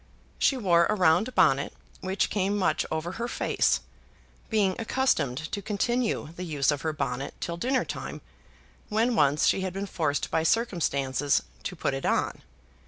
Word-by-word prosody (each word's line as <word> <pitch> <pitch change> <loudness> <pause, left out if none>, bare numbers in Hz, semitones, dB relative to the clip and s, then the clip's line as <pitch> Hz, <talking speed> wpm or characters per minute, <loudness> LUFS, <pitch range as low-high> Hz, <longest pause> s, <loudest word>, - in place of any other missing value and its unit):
She 270 - +3
wore 170 -7 +4
a 215 - +1
round 185 +6 +3
bonnet 145 -6 +3 0.3
which 190 +1 -1
came 200 0 0
much 190 - +1
over 160 +2 -2
her 235 +5 -4
face, - - +1 0.7
being 200 -4 +2
accustomed 220 - +1
to 200 - -3
continue 220 -1 -1
the 180 - -5
use 150 -4 +1
of 145 -1 -2
her 160 - -1
bonnet 135 -3 -3
till 170 - -3
dinner 255 +9 0
time - - -6 0.7
when 225 +3 +2
once 145 -3 +3
she - - +3
had 185 -1 -3
been 195 +1 -3
forced 150 -7 -1
by 160 - +2
circumstances 145 - +1 0.2
to 180 - -5
put 140 - -1
it 135 - -2
on. - - 0
180 Hz, 165 wpm, -27 LUFS, 150-215 Hz, 0.7 s, wore